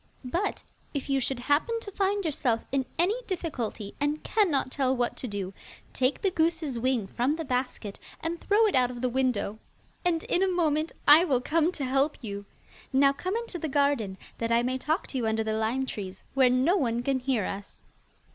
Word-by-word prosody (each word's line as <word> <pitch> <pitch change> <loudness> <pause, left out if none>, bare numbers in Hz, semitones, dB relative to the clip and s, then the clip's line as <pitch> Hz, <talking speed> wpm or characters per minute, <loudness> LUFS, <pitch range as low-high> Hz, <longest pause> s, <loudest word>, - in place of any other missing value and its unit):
But 345 +11 -2 0.3
if 280 0 -2
you 275 - +3
should 265 0 -2
happen 300 - +1
to 405 - -7
find 400 0 0
yourself 245 -7 0
in 265 -2 0
any 395 +9 +2
difficulty, 250 - -3
and 295 +2 0
cannot 320 -12 +2
tell 265 -2 +1
what 240 -1 0
to 255 - -4
do, 200 -3 -4 0.4
take 260 +2 +1
the 390 - +3
goose's 320 -6 0
wing 250 -3 +1
from 245 +9 0
the 325 0 -4
basket, 250 -5 -3 0.2
and 330 +1 -3
throw 425 +2 +4
it 420 - +2
out 250 -1 +4
of 245 -1 -7
the 255 - +1
window, 240 -5 0 0.4
and 335 -2 +1
in 355 - +1
a 385 - +4
moment 320 -3 +1 0.2
I 300 +4 +9
will 275 -8 +2
come 320 +6 +2
to 280 - -3
help 275 +3 +1
you. 200 -4 -6 0.5
Now 275 +1 +5
come 365 +8 -3
into 460 -6 -4
the 315 - -3
garden, 275 -9 +1 0.2
that 230 0 -1
I 235 +1 +4
may 255 +1 -1
talk 315 +6 0
to 270 - -5
you 230 - 0
under 220 0 +1
the 220 0 -1
lime 225 +5 0
trees, 190 -6 -6
where 265 -2 +5
no 260 +9 +3
one 240 -6 0
can 270 0 +1
hear 250 -6 0
us. 200 +1 -7
270 Hz, 205 wpm, -28 LUFS, 240-325 Hz, 0.5 s, I